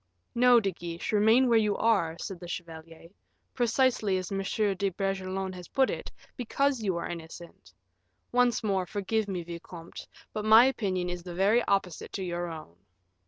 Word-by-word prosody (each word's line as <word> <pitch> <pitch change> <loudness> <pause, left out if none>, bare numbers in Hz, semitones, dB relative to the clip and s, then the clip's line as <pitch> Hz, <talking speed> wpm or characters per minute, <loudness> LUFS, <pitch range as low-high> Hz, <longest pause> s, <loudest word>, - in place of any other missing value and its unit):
"No, 245 0 +6
De 200 -3 -1
Guiche, 170 -1 -6
remain 220 +5 +4
where 230 -2 +5
you 210 -2 +1
are," 190 -8 +1
said 190 -3 -6
the 175 - -9
chevalier; 165 -1 -8 0.4
"precisely 235 -4 +2
as 185 0 -5
M. 195 - -1 0.3
de 195 +1 -1
Bragelonne 190 0 -3
has 180 -1 -9
put 265 -1 +2
it, - - -6 0.2
because 270 +1 0
you 190 -5 -1
are 170 - -3
innocent. 170 0 -10 0.6
Once 245 -2 +2
more, 190 -3 0
forgive 205 +2 -1
me, 185 -3 -3
vicomte; 170 0 -9 0.3
but 215 - -3
my 220 +3 +8
opinion 190 -9 -1
is 180 0 -4
the 175 0 -8
very 205 +6 +3
opposite 195 -4 -1
to 195 - -3
your 175 -1 -3
own." 155 - -9
195 Hz, 165 wpm, -28 LUFS, 175-220 Hz, 0.6 s, my